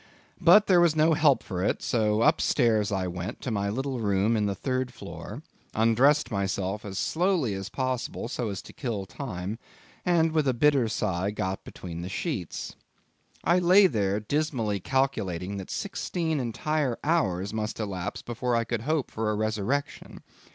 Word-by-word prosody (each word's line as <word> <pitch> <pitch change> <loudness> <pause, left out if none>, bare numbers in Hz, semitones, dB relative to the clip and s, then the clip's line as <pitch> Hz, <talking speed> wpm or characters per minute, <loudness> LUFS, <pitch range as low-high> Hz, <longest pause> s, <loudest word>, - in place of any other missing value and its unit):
But 185 +5 +7
there 180 -3 +5
was 170 -3 +4
no 160 +1 +4
help 145 -3 +4
for 90 -2 -3
it, - - 0
so 110 -2 +1
up 155 +5 +4
stairs 110 -5 +2
I 95 -2 0
went 90 +4 -5
to 125 - -3
my 100 -2 0
little 130 +3 -2
room 105 +1 +2
in 105 -2 +1
the 100 - -1
third 130 +3 -2
floor, - - -9 0.3
undressed 120 +7 +3
myself 100 0 -2
as 95 -2 -6
slowly 170 - +1
as 95 0 -5
possible 130 -3 -2
so 120 -1 -3
as 100 -1 -5
to - - -13
kill 110 -8 -3
time, 100 -1 -5 0.4
and 165 -2 +3
with 155 -3 +1
a 130 - +2
bitter 135 -1 +3
sigh 100 -3 -1
got 95 -2 -3
between 85 -2 -8
the 90 - -5
sheets. 100 - -4 0.7
I 175 +2 +4
lay 185 +3 +6
there 105 - +1
dismally 115 -4 -1
calculating 100 -7 -1
that 95 - -7
sixteen 170 -5 -2
entire 130 +2 -1
hours 100 - +1
must 110 0 -3
elapse 95 -5 -4
before 120 +1 -1
I 115 - +2
could 115 -1 -3
hope 150 +2 -1
for 110 -1 -1
a 105 - 0
resurrection. 110 +6 -2
115 Hz, 170 wpm, -27 LUFS, 100-145 Hz, 0.7 s, But